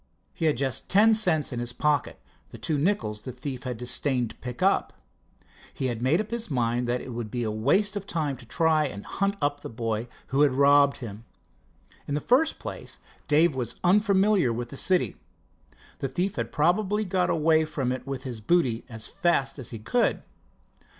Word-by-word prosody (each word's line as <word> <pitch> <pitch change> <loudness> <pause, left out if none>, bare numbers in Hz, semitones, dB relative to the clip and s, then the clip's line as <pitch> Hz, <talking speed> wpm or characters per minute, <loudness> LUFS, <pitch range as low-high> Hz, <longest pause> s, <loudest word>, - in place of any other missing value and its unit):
He 165 - -3
had 150 -5 +2
just 130 0 -2
ten 215 +3 +6
cents 170 - +3
in 120 - -3
his 120 0 -3
pocket—the 150 -1 -3
two 155 -3 -1
nickels 145 - -1
the 130 - -6
thief 130 0 -6
had 125 -2 -3
disdained 125 0 -1
to - - -15
pick 125 +6 -6
up. 195 - +2 0.8
He 130 - -1
had 115 - -8
made 135 +8 +3
up 215 +1 -4
his 235 -3 -3
mind 120 -2 0
that 120 +1 -1
it - - -9
would 115 -2 -5
be 120 +2 -3
a 110 - -1
waste 165 - +1
of 200 -1 -5
time 150 -6 -1
to 125 - -13
try 155 +1 +3
and 100 -6 -8
hunt 200 0 -1
up 145 0 0
the - - -8
boy 115 0 -3 0.2
who 135 +2 +1
had 140 -3 +4
robbed 140 0 +5
him. 115 -2 -8 0.8
In 145 - -2
the - - 0
first 270 - +2
place, - - -7 0.3
Dave 155 +2 +4
was 125 -3 -2
unfamiliar 195 - +3
with 120 +1 -4
the 140 - -8
city. 175 - +2 0.8
The 135 - -2
thief 180 +9 -2
had - - -3
probably 200 +7 +1
got 180 -1 0
away 160 0 +3
from 135 -5 -2
it 130 +1 -5
with 135 -2 -4
his 120 -4 -6
booty 125 -4 +1
as 110 -2 -5
fast 170 -8 0
as 125 - -6
he 115 - -6
could. 230 - 0
140 Hz, 195 wpm, -26 LUFS, 120-180 Hz, 0.8 s, ten